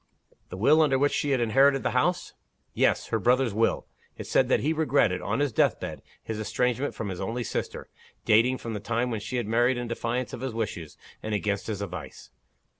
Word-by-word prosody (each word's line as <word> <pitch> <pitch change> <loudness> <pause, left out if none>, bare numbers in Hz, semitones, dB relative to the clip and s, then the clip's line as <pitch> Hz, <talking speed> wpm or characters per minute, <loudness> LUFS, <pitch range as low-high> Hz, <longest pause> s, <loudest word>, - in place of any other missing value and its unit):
"The 90 - -7
will 145 +10 +5
under 140 -4 +3
which 145 +2 +2
she 145 - 0
had 135 -2 +2
inherited 135 +4 +3
the - - 0
house?" 175 +8 0 0.4
"Yes. - - +1
Her 110 - 0
brother's 125 +1 +2
will. 115 +2 +1 0.3
It - - -7
said, - - +2
that - - +3
he 155 +3 +1
regretted, 140 - +1
on 115 +8 -1
his 145 -5 0
death - - +2
bed, - - -6 0.2
his 110 -1 -5
estrangement 125 +5 -1
from 110 - -4
his 95 -1 -5
only 115 +5 -3
sister, - - -4 0.4
dating 120 +4 +4
from 115 -2 -6
the 105 - -3
time 115 +4 -1
when 110 - -2
she 120 +4 -4
had 120 - -1
married 120 +4 +2
in 120 0 -4
defiance 120 +1 -3
of - - -6
his 130 -4 -4
wishes 90 -8 -4 0.2
and 110 -1 -2
against 100 -1 -2
his 105 -3 -3
advice. 85 -8 -8
120 Hz, 210 wpm, -27 LUFS, 105-130 Hz, 0.4 s, will